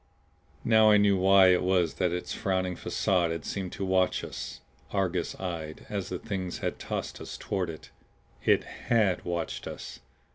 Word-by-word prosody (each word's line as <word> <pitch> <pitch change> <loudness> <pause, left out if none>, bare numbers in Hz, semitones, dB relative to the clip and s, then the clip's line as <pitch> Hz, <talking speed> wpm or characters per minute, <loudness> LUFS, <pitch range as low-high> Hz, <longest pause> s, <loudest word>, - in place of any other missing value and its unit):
Now 110 -1 +6
I 105 - +7
knew 100 -1 +4
why 95 0 +6
it 90 -1 +4
was 90 -4 +2
that 90 +4 0
its 90 0 -3
frowning 95 -2 -1
facade 90 -2 +1
had 80 -2 -4
seemed 95 -3 -3
to 95 - -3
watch 95 -1 +2
us - - -6 0.3
Argus 95 -3 -1
eyed 80 -4 -5
as 100 -2 -3
the 90 - -3
Things 95 -3 -4
had - - -3
tossed - - -4
us - - -7
toward 95 -3 -2
it. 80 - -9 0.5
It - - +4
HAD 110 -6 0
watched 85 -1 -3
us! - - -8
95 Hz, 170 wpm, -28 LUFS, 90-100 Hz, 0.5 s, I